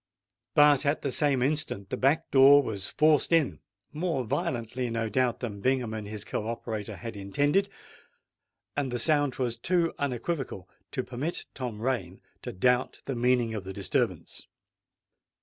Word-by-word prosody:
But 145 -1 +6
at 145 +1 0
the 140 - -1
same 140 -3 +2
instant 140 -9 -1
the - - 0
back 150 +5 +1
door 140 +1 +7
was 100 -5 -4
forced 155 0 +3
in;—more 150 - -1
violently, 120 +2 -2
no 115 -1 -2
doubt, 125 +2 0
than 105 -5 -5
Bingham 125 -3 +1
and 110 -2 -5
his 105 0 -6
co 110 - -3
operator 115 -3 -4
had 115 -2 -7
intended; 145 - +1 1.1
and 140 -3 -1
the 120 - -1
sound 145 0 +2
was 120 -3 -2
too 170 +6 +1
unequivocal 135 - -3 0.3
to 130 - -1
permit 130 +8 -4
Tom 125 -5 -5
Rain 100 -8 -2 0.2
to - - -5
doubt 125 +6 +1
the 135 - -3
meaning 120 -1 +2
of 105 -3 -4
the 95 0 -7
disturbance. 95 -1 -2
125 Hz, 150 wpm, -28 LUFS, 110-145 Hz, 1.1 s, door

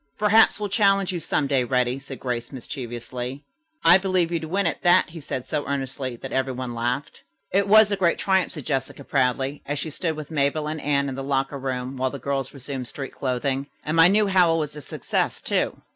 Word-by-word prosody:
"Perhaps 215 +1 +5
we'll 210 - -2
challenge 195 -2 +3
you 175 - -3
some 155 - 0
day, 135 -2 +2
Reddy," 125 +1 0
said 135 -1 -9
Grace 120 -2 -3
mischievously. 125 0 -6 0.4
"I 175 +3 +8
believe 185 -3 +1
you'd 165 -2 -1
win 190 +5 0
at 170 - -1
that," 175 0 +4
he 165 - -8
said 130 -3 -5
so 145 - -2
earnestly 135 -2 -3
that - - -8
every 130 0 0
one 125 -1 -5
laughed. 120 +4 -3 0.3
"It 200 +1 +2
was 215 0 +7
a - - +2
great 180 -3 +2
triumph," 190 -1 +1
said 150 -6 -7
Jessica 135 -1 -2
proudly, 135 +1 0
as 145 +1 -3
she 155 - -4
stood 160 +1 -2
with 155 0 -8
Mabel 150 0 0
and 155 0 -4
Anne 140 -1 +1
in 135 - -3
the 135 +1 -5
locker 135 0 -1
room 130 0 -4
while 130 0 0
the 140 - -6
girls 135 0 -2
resumed 135 -2 -6
street 135 0 -6
clothing. 135 +1 -1 0.2
"And 155 - -2
my 165 0 +8
new 210 +3 +4
howl 180 -4 +4
was 150 -2 -3
a 150 - -7
success, - - -2
too." - - -1
140 Hz, 215 wpm, -24 LUFS, 130-170 Hz, 0.4 s, I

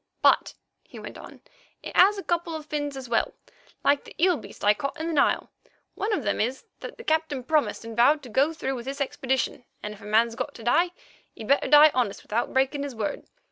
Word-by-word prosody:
"But," - - +4 0.3
he - - -14
went - - -9
on, - - -12 0.4
"it - - -8
has 400 +3 +6
a 395 - -5
couple 340 -1 -1
of 310 -1 -7
fins 290 -2 -3
as 260 -1 -7
well, 230 -1 0 0.5
like 285 0 +3
that - - -14
eel 360 +1 +4
beast 280 - -9
I 205 - +6
caught 275 +8 -5
in 320 - -3
the 335 - -2
Nile. 285 - +2 0.4
One 415 +3 -2
of 400 -10 0
them 205 -1 0
is 250 +5 -2
that - - -8
the 470 - -10
Captain 315 - 0
promised 300 -4 0
and 230 -1 -7
vowed 280 +6 +4
to 250 - -10
go 275 +8 +2
through 270 -4 -3
with 240 -2 -6
this 275 +2 -5
expedition, 265 -2 -1 0.2
and 210 - -4
if 210 - -15
a - - -11
man's 225 +2 +3
got 280 +5 -5
to 230 - -11
die, 335 +10 +3 0.5
he'd 220 - -9
better 280 - +3
die 295 +2 +8
honest 245 -6 -1
without 230 +3 -2
breaking 270 +2 +1
his 280 -3 -5
word. 215 -2 -4
275 Hz, 230 wpm, -26 LUFS, 235-310 Hz, 0.5 s, die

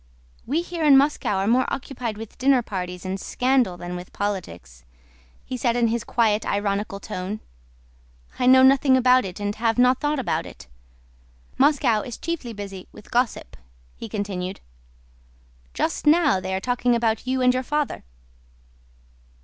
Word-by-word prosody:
"We 310 +7 0
here 345 -2 -5
in 285 -3 +7
Moscow 280 -7 +1
are 190 0 0
more 245 +4 +2
occupied 245 -5 -4
with 225 -1 -10
dinner 260 -1 +3
parties 180 -3 -5
and 190 +1 -3
scandal 250 -5 +1
than 175 0 -6
with 180 0 -8
politics," 90 - -5 0.7
said 240 -1 0
he - - +1
in 230 -1 +3
his 235 0 -1
quiet 220 -3 +1
ironical 200 0 -2
tone. 190 +2 -5 1.0
"I 250 - +2
know 260 0 +7
nothing 265 0 +5
about 255 -1 +4
it 185 +1 -7
and 205 0 -2
have 225 0 0
not 250 +1 +4
thought 295 0 0
about 260 - -2
it. - - -12 0.9
Moscow 265 -6 +3
is 240 0 -7
chiefly 325 -8 -4
busy 200 -3 -8
with 210 - -15
gossip," 240 - -1 0.4
he 225 - -8
continued. 195 -3 -4 1.2
"Just - - -2
now 300 - +4
they 190 0 -3
are - - -1
talking 245 +2 +1
about 230 0 -1
you 260 0 0
and 250 0 +5
your 255 - 0
father." 295 +2 -2
235 Hz, 155 wpm, -23 LUFS, 200-260 Hz, 1.2 s, in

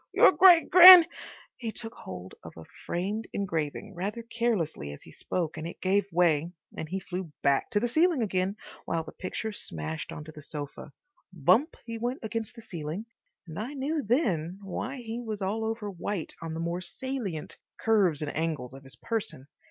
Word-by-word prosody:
"Your - - +8
great 350 0 +7
gran—" 360 -1 +12 0.5
He 230 -3 -4
took 225 +1 -6
hold 90 0 -9
of 80 - -11
a 80 - -9 0.2
framed 205 +6 -2
engraving 185 +1 -3
rather 205 +6 -4
carelessly 225 - -1
as - - -11
he - - -14
spoke 165 -3 -3
and 160 +1 -4
it - - -9
gave 195 +1 +1
way, 165 -2 +2 0.2
and 155 - -5
he 190 +2 -2
flew 180 -3 -6
back 140 -1 +2
to 205 - +1
the 240 - 0
ceiling 315 +1 +3
again, 190 -1 0 0.3
while 165 -1 -1
the 160 - -10
picture 220 +4 -4
smashed 80 - -4
onto 150 +1 -8
the 150 - -11
sofa. 145 0 -7 0.4
Bump 185 - +3
he 230 -1 -5
went 245 +3 -2
against 225 0 -4
the 230 - -10
ceiling, 170 +1 -5 0.4
and 160 +3 -7
I 250 +7 -5
knew 290 +3 -1
then 195 - 0
why 230 +7 -4
he 230 0 -5
was 220 -3 -5
all 210 +4 -1
over 220 -2 -3
white 185 -1 -4
on 165 -1 -5
the - - -4
more 170 +2 -2
salient 220 - -5 0.2
curves 195 -9 +2
and 145 - -4
angles 155 -6 -2
of 135 - -11
his 135 -1 -5
person. 210 - -3
190 Hz, 185 wpm, -28 LUFS, 160-230 Hz, 0.5 s, gran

